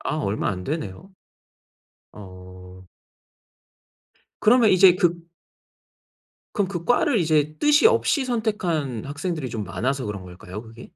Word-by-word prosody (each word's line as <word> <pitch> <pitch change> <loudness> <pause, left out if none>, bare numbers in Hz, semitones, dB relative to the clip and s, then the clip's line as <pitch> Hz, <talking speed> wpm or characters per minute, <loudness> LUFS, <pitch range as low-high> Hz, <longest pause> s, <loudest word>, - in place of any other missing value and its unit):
아 150 - -3
얼마 105 -8 -2
안 90 -2 -6
되네요. 150 - -5 1.0
어 90 -1 -13 1.6
그러면 230 0 +5
이제 185 -1 +6
그 170 -1 0 1.3
그럼 200 -3 0
그 175 -3 -5
과를 245 +1 +2
이제 155 -3 +1
뜻이 295 +6 +5
없이 450 - +2
선택한 175 - -2
학생들이 150 -1 -4
좀 110 -2 -5
많아서 125 +10 -2
그런 105 -2 -5
걸까요? 90 +3 -10
그게? 115 +1 -13
150 Hz, 235 characters per minute, -23 LUFS, -, 1.6 s, 이제